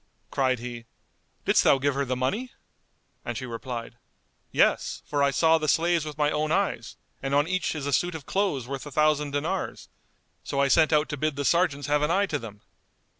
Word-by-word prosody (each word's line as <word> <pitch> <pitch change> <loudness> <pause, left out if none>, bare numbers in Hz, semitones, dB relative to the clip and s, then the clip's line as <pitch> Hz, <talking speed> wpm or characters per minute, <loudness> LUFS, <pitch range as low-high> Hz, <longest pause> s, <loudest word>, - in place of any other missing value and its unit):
Cried 130 -2 +1
he, 120 0 -7 0.6
"Didst - - +4
thou - - +5
give 140 +1 0
her 140 +1 -1
the 130 0 -1
money?" 205 - -2 0.7
And - - -4
she 130 - -5
replied, 120 0 -6 0.5
"Yes; - - +1
for 145 -1 -1
I 140 - +4
saw 160 +4 +3
the 155 - -2
slaves 165 +1 +2
with 150 -1 -7
my 150 -1 +2
own 155 +1 -1
eyes, 165 - -1 0.2
and 135 +1 -1
on 145 +2 +3
each 185 -2 -1
is 145 -3 -4
a 145 - -1
suit 175 +5 +1
of 150 -4 -8
clothes 190 - -1
worth 135 +2 -5
a - - -9
thousand 150 0 +2
dinars; 145 0 -3 0.5
so 140 - -3
I 140 0 +3
sent 160 +2 +4
out 150 0 +3
to 150 - -3
bid 155 +1 -1
the 140 0 -3
sergeants 170 -4 +2
have 145 0 +1
an 150 - +1
eye 195 +4 +3
to 150 -7 -2
them." 105 -3 -10
145 Hz, 210 wpm, -26 LUFS, 135-160 Hz, 0.7 s, thou